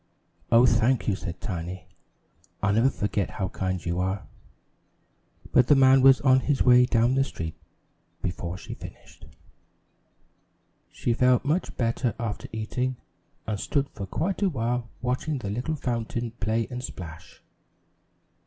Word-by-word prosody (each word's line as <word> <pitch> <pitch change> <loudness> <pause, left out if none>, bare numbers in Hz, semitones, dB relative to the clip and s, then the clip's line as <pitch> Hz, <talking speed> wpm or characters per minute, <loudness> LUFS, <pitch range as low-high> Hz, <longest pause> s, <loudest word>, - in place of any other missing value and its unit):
"Oh, 115 +2 +7
thank 120 +1 +2
you," 100 - +2
said 90 -3 -6
Tiny. 90 -2 -5 0.8
"I'll 105 -1 +3
never 115 +5 +4
forget 105 -5 -2
how 95 -3 -3
kind 95 -3 -3
you 85 +1 -1
are." 95 +2 -2 1.3
But 125 -1 +5
the 145 - +6
man 135 0 +6
was 135 0 +7
on 130 -1 +5
his 140 +1 +1
way 125 0 +6
down 120 +2 +3
the 135 0 +3
street 80 - -5 0.7
before 90 0 -3
she - - -8
finished. - - -12 1.6
She 120 - -1
felt 125 +1 +3
much 160 +6 -1
better 115 0 0
after 115 -3 -4
eating 125 +4 -2 0.5
and 105 -2 -3
stood 140 +4 -1
for 100 - -7
quite 175 - -2
a 200 - +3
while 120 -4 -2
watching 130 +4 -1
the 100 -6 -4
little 125 +9 -2
fountain 120 -3 -3
play 110 +1 -1
and 125 0 -5
splash. 85 -5 -9
120 Hz, 145 wpm, -26 LUFS, 100-130 Hz, 1.6 s, Oh